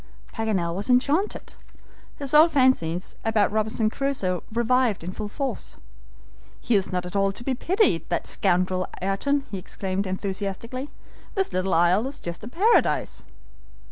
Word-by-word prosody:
Paganel 200 -7 -1
was 200 +7 -4
enchanted. 285 +11 +1 0.6
His 280 -1 -5
old 315 +3 +7
fancies 200 - +2
about 215 -3 +2
Robinson 220 0 0
Crusoe 200 - -1
revived 235 -3 +1
in 175 - -4
full 210 +2 -5
force. 270 0 -4 0.8
"He 240 - -1
is 195 -3 +2
not 180 -1 -1
at 180 - -8
all 195 0 +2
to 235 - -6
be 265 - 0
pitied, 350 - +1
that - - -1
scoundrel, 185 +1 +1
Ayrton!" 270 +10 0
he 195 - -3
exclaimed, 190 +1 -3
enthusiastically. 200 +7 -4 0.5
"This 390 -1 0
little 185 -1 +1
isle 175 +8 +3
is 275 - -6
just 170 +2 -6
a - - -6
paradise!" 395 - +2
215 Hz, 145 wpm, -25 LUFS, 185-260 Hz, 0.8 s, old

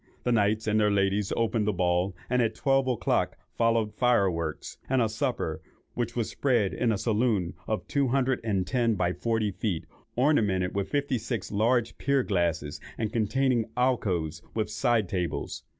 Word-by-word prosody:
The 125 - +1
knights 110 -1 +2
and 110 0 +2
their 105 -1 +4
ladies 100 0 +1
opened 115 -2 +1
the - - +3
ball, 90 +1 +1
and 125 0 +2
at 115 -2 0
twelve 135 -1 +2
o'clock 125 -3 0 0.2
followed 115 -2 +1
fireworks, 95 -10 0
and 130 0 +2
a 115 - +3
supper, 110 0 -2 0.3
which 120 -1 -3
was 115 -3 0
spread 120 -8 +1
in 120 -2 +1
a 105 - 0
saloon 105 -5 +1
of 110 - -2
two 140 -2 +1
hundred 130 0 +1
and 100 -5 0
ten 120 -2 +1
by 90 -2 0
forty 110 +2 0
feet, 95 -3 -2 0.3
ornamented 105 -10 +2
with 100 -1 -2
fifty 140 -3 0
six 115 -2 -4
large 115 +3 +1
pier 140 -1 +2
glasses, 85 -7 -1 0.2
and 110 -1 -2
containing 120 +1 +1
alcoves 90 -11 0
with 110 -1 -1
side 115 0 +1
tables. 90 -3 -3
110 Hz, 165 wpm, -28 LUFS, 100-120 Hz, 0.3 s, their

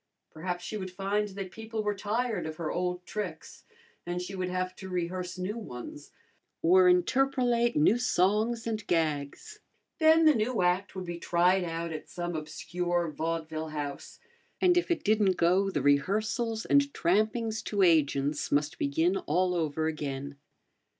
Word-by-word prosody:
Perhaps 175 +2 -4
she 215 - -4
would 185 -2 -5
find 200 +3 -1
that 195 -2 -7
people 220 +1 -5
were 210 0 0
tired 215 0 -2
of 155 - -6
her 160 -1 -3
old 180 0 -2
tricks, 185 -7 -6 0.4
and 175 0 -3
she 180 +2 -6
would 185 -1 -2
have 185 0 -2
to 190 - -8
rehearse 180 0 -3
new 195 +5 -3
ones, 145 - -9 0.5
or 180 +2 +6
interpolate 240 +5 +2
new 195 +10 +4
songs 225 +1 +1
and 220 -2 -3
gags. 160 - -1 0.4
Then 320 0 +6
the 310 - +7
new 225 -3 0
act 180 +3 0
would 185 -1 -5
be 175 -1 -5
tried 180 +2 +2
out 165 -1 -3
at 155 - -7
some 175 -1 -4
obscure 170 +2 -2
vaudeville 160 0 -3
house, 145 -2 -6 0.4
and 360 -1 +4
if 350 - +1
it 345 - 0
didn't 205 -3 +3
go 185 +3 +3
the 165 - -2
rehearsals 215 - +1
and 285 0 +3
trampings 220 +5 +1
to 200 -2 +1
agents 145 -4 +2
must 145 +4 0
begin 160 +7 +1
all 180 +3 0
over 160 -2 -1
again. 140 -3 -4
180 Hz, 155 wpm, -29 LUFS, 165-215 Hz, 0.5 s, the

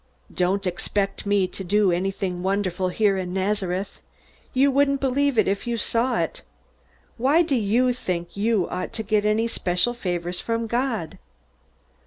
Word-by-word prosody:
"Don't 190 +2 +1
expect 195 +3 -2
me 200 -2 +3
to 195 - -6
do 200 +1 +3
anything 185 0 -2
wonderful 190 -1 0
here 200 0 +2
in 180 -1 -4
Nazareth. 190 -1 -2 0.5
You 275 +1 +3
wouldn't 280 0 +2
believe 275 0 +1
it 215 - +4
if 200 +4 -1
you 235 -1 -1
saw 235 +3 +1
it. - - -2 0.8
Why 280 +8 +4
do 300 -4 0
you 240 +3 +2
think 175 -7 -4
you 205 -2 +1
ought 185 - -4
to 220 - -3
get 210 0 +1
any 215 +2 +2
special 185 +1 0
favors 180 -5 -3
from 230 0 -1
God?" 235 -6 -2
205 Hz, 155 wpm, -24 LUFS, 185-235 Hz, 0.8 s, it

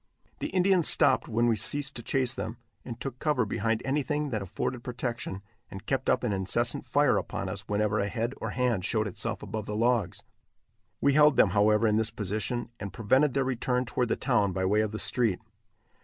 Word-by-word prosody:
The - - -2
Indians 185 -2 +3
stopped 130 -2 +3
when 115 +1 +1
we 115 -1 +3
ceased 145 +5 0
to 120 - -4
chase 130 0 0
them, 110 +3 -5 0.3
and 115 -2 -8
took 130 -2 -6
cover 150 -6 +1
behind 115 +1 -1
anything 145 +1 -1
that 110 -3 -2
afforded 120 +6 -4
protection, 120 -5 -4 0.3
and 95 +2 -9
kept 135 -1 -1
up 125 - +2
an 115 -4 0
incessant 100 +5 -1
fire 145 -3 +3
upon - - -3
us - - -5
whenever 105 +1 0
a 100 - 0
head 115 +4 -2
or - - -4
hand 125 -6 0
showed 110 +2 0
itself 100 - -4
above 110 -1 -5
the 105 - -3
logs. 115 -4 0 0.8
We 140 - +3
held 150 -1 +6
them, 100 - +4
however, 105 +2 +3
in 105 -1 +3
this 110 0 +2
position, 110 +4 -3
and 100 - -5
prevented 130 +5 +2
their 135 - +2
return 125 0 -1
toward 125 +1 -1
the - - 0
town 105 -8 +1
by 95 0 -1
way 105 +3 +3
of 110 -1 -1
the 110 - -4
street. 115 -5 +2
120 Hz, 200 wpm, -28 LUFS, 105-130 Hz, 0.8 s, held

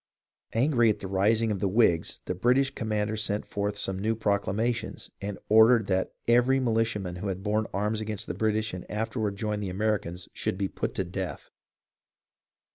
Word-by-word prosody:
Angry 120 -1 +3
at 105 - +1
the 95 - -6
rising 105 +4 +2
of 100 - -2
the 100 - +1
Whigs, 90 -6 +2
the - - -1
British 130 +8 +2
commander 110 -3 -1
sent 105 -1 -2
forth 105 0 -2
some 95 -1 -2
new 110 +3 0
proclamations, 110 +2 -1
and 100 0 -4
ordered 110 +1 +6
"that 95 -1 -1
every 125 +3 +4
militiaman 110 -7 0
who 100 - -4
had 95 0 -3
borne 110 +1 0
arms 105 +2 -1
with 105 -2 -4
the - - -4
British 110 0 0
and 90 - -7
after 110 +3 -3
ward 105 -2 -1
joined 105 0 -2
the 100 - -3
Americans 95 -3 -2
should - - -2
be 100 0 0
put - - -4
to - - 0
death." 90 +1 -5
105 Hz, 180 wpm, -28 LUFS, 95-115 Hz, -, ordered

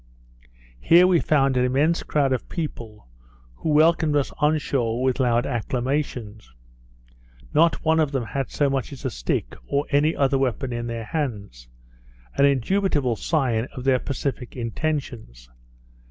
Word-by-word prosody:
Here 170 - +6
we 180 -2 +4
found 135 -4 +2
an 125 - +3
immense 145 +7 +2
crowd 140 -3 +1
of 130 - -4
people, 115 - -6 0.5
who - - -3
welcomed 155 0 +3
us 145 -2 +1
on 150 +2 +3
shore 125 -4 -1
with 130 0 +1
loud 120 -2 +2
acclamations. 120 - -3 1.0
Not 165 +1 +3
one 160 0 +3
of 155 -3 +1
them 135 -4 -2
had 135 +2 -3
so 145 - +1
much 135 -1 -2
as 135 - -9
a - - -1
stick, - - -2
or 140 +1 0
any 150 +3 +2
other 135 -1 +2
weapon 130 -1 -1
in 120 0 -4
their 115 -1 -5
hands; 105 - -4 0.7
an 140 - +4
indubitable 140 - +1
sign 125 -6 0
of 125 - -6
their 130 -1 +3
pacific 135 -2 -4
intentions. 115 - -4
135 Hz, 150 wpm, -23 LUFS, 120-150 Hz, 1.0 s, Here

